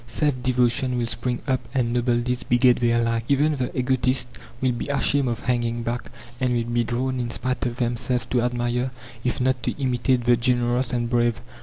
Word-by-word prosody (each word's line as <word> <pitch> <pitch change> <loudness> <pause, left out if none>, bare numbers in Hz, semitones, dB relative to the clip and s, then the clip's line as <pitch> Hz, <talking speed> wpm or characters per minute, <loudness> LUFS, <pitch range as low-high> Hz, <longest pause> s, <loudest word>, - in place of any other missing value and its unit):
Self 130 +1 0
devotion 125 0 +2
will 120 - 0
spring 120 +2 -3
up, 130 -2 +2 0.2
and 120 -3 +1
noble 120 0 +2
deeds 125 +1 -2
beget 120 0 +3
their 120 -1 +2
like; 115 0 0
even 145 +2 +2
the 125 0 -3
egotists 130 -1 +1 0.3
will 130 0 +2
be 120 - -4
ashamed 140 -1 +2
of 120 -1 -2
hanging 120 -1 -1
back, 120 +1 -4 0.3
and 125 -1 +1
will 120 -1 +1
be 120 0 +2
drawn 125 +2 -2
in 120 -1 -2
spite 125 +1 -2
of 120 - -4
themselves 120 0 -1
to 125 - +2
admire, 120 +1 0 0.3
if 125 - -1
not 130 0 +1
to - - -3
imitate, 125 -1 +1
the 120 0 +5
generous 120 +1 +1
and 120 -1 0
brave. 120 -1 +1
125 Hz, 195 wpm, -24 LUFS, 120-130 Hz, 0.3 s, the